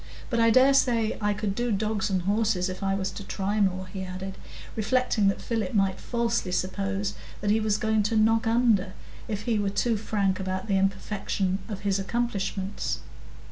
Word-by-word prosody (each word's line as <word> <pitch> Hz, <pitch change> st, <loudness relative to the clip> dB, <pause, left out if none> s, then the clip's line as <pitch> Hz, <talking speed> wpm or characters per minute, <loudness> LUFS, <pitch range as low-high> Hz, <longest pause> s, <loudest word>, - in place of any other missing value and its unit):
But 235 Hz, -, +1 dB
I 230 Hz, 0 st, +5 dB
dare 260 Hz, +4 st, +6 dB
say 235 Hz, -5 st, +2 dB
I 210 Hz, 0 st, +2 dB
could 205 Hz, -1 st, -2 dB
do 240 Hz, +3 st, -1 dB
dogs 210 Hz, 0 st, 0 dB
and 185 Hz, -2 st, 0 dB
horses 205 Hz, -2 st, +1 dB
if 185 Hz, +1 st, -6 dB
I 195 Hz, 0 st, +1 dB
was 190 Hz, -1 st, -2 dB
to 200 Hz, -, -7 dB
try 200 Hz, +2 st, -2 dB
more," 185 Hz, -1 st, +1 dB
he 190 Hz, 0 st, -6 dB
added, 185 Hz, +1 st, -6 dB, 0.4 s
reflecting 225 Hz, -1 st, +2 dB
that 195 Hz, -, +1 dB
Philip 225 Hz, -3 st, -2 dB
might 195 Hz, -2 st, +2 dB
falsely 235 Hz, -5 st, -1 dB
suppose 195 Hz, +2 st, -1 dB, 0.3 s
that 205 Hz, 0 st, +1 dB
he 220 Hz, -, +3 dB
was 215 Hz, -1 st, +1 dB
going 220 Hz, 0 st, +2 dB
to 225 Hz, -, +1 dB
"knock 225 Hz, +1 st, +3 dB
under," 225 Hz, -5 st, +3 dB, 0.3 s
if 210 Hz, -2 st, -3 dB
he 225 Hz, -2 st, +1 dB
were 200 Hz, -1 st, +1 dB
too 225 Hz, +3 st, +1 dB
frank 200 Hz, -3 st, 0 dB
about 190 Hz, 0 st, -3 dB
the 200 Hz, -, +1 dB
imperfection 195 Hz, 0 st, -1 dB
of 205 Hz, -3 st, -5 dB
his 200 Hz, -1 st, +1 dB
accomplishments. 195 Hz, -2 st, -2 dB
205 Hz, 185 wpm, -27 LUFS, 195-225 Hz, 0.4 s, dare